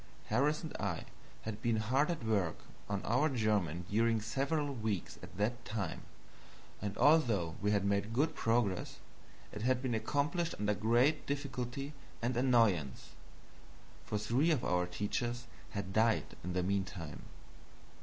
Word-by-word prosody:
Harris 145 +9 +2
and 160 - -6
I 100 -5 -2 0.4
had 110 -1 -5
been 120 -2 +2
hard 130 - +2
at 165 -9 -2
work 100 -7 +1 0.3
on 100 -1 -1
our 135 +8 +3
German 105 - 0
during 115 +2 +2
several 140 +6 -1
weeks 110 -7 -3
at - - -11
that 120 +4 0
time, 105 -2 -3 0.8
and 100 0 -3
although 115 - +4
we 105 - +1
had 100 -2 +2
made 100 +2 +1
good 150 +7 +2
progress, 115 -7 0 0.5
it 105 - -6
had 125 +2 +2
been 130 -2 -1
accomplished 145 +9 0
under 105 0 +2
great 120 +8 +2
difficulty 140 0 -3 0.3
and 120 +2 -1
annoyance, 115 - +2 0.9
for 105 - -2
three 120 +9 +2
of 155 -7 +2
our 90 0 +1
teachers 120 +6 -2 0.2
had 100 -2 -4
died 110 0 +2
in 90 +1 -3
the 90 0 +1
mean 100 +1 +1
time. 85 -6 -8
115 Hz, 145 wpm, -34 LUFS, 100-130 Hz, 0.9 s, although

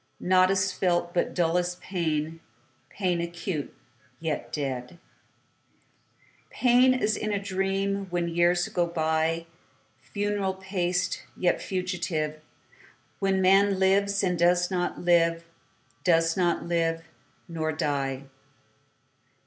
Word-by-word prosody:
Naught 185 0 +4
is 190 0 +1
felt 175 -2 0
but 175 - -1
dullest 175 +1 0
pain, 160 -3 -2 0.5
Pain 180 -4 -1
acute, 170 -2 -4 0.5
yet 160 -2 -3
dead; 130 0 -4 1.5
Pain 255 +1 +4
as 215 -4 +1
in 215 - -3
a 205 - +1
dream, 195 0 -1
When 175 -1 -1
years 175 +1 +2
go 175 -1 0
byFuneral 165 +3 -3
paced, 185 -2 -1 0.2
yet 180 - +1
fugitive, 175 -5 -3 0.8
When 195 -1 +1
man 195 +1 +4
lives, 200 +1 +2
and 180 -2 0
doth 175 +1 +3
not 180 -1 -1
live, 170 -1 +3 0.6
Doth 165 -2 +3
not 175 -2 +1
live—nor 165 -1 -3
die. 140 -3 -2
175 Hz, 100 wpm, -27 LUFS, 165-190 Hz, 1.5 s, Naught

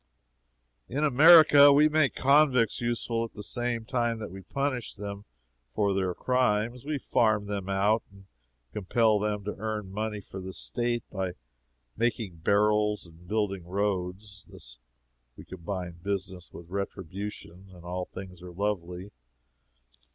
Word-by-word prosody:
In 145 +5 -1
America 150 0 +8
we 145 +2 +6
make 155 -2 +2
convicts 135 -5 +3
useful 120 -1 -1
at 115 - -8
the 105 - -7
same 120 0 -2
time 120 -1 0
that 105 -5 -7
we 95 +1 -9
punish 130 +4 -3
them 100 0 -7 0.4
for 100 - 0
their 95 -2 -1
crimes. 120 -1 0
We 150 +1 -2
farm 110 -5 +1
them 100 -2 -4
out 100 +3 +2
and 100 0 -17 0.5
compel 105 +2 +2
them 105 0 -2
to 105 - -4
earn 105 -3 -4
money 105 +1 -3
for 95 -1 -9
the 95 0 -7
State 120 +1 -2
by 95 -2 -3 0.6
making 115 -6 -1
barrels 105 +4 +2
and 85 +1 -17
building 100 -3 -1
roads. 100 +1 -3
Thus - - -11 0.6
we - - -11
combine 90 -1 -6
business 95 -2 -4
with 85 0 -12
retribution, 95 0 -6
and 90 -2 -14
all 90 +1 -3
things 90 -2 -10
are 90 0 -9
lovely. 90 0 -3
105 Hz, 140 wpm, -28 LUFS, 95-115 Hz, 0.6 s, America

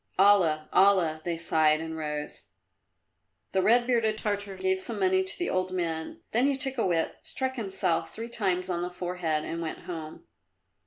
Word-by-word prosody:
"Allah! 180 -6 +4
Allah!" 180 -5 +4
they 170 0 -2
sighed 155 -2 +2
and 160 0 -5
rose. 150 -1 -5 1.1
The 190 - +2
red 240 +4 +5
bearded 230 -3 +1
Tartar 205 -2 -2
gave 190 0 +1
some 215 +2 -5
money 190 0 +3
to 190 0 -1
the 355 - -1
old 185 0 -1
men, 165 -3 -3
then 245 +5 +4
he 280 - +2
took 265 -1 -2
a 225 - +2
whip, 165 -2 0
struck 260 0 -3
himself 190 -6 -1
three 225 +1 -6
times 185 -6 0
on 175 -2 -2
the 175 - -2
forehead 175 -3 -2
and 165 +1 -4
went 160 - -5
home. 160 -3 -7
185 Hz, 175 wpm, -28 LUFS, 165-205 Hz, 1.1 s, red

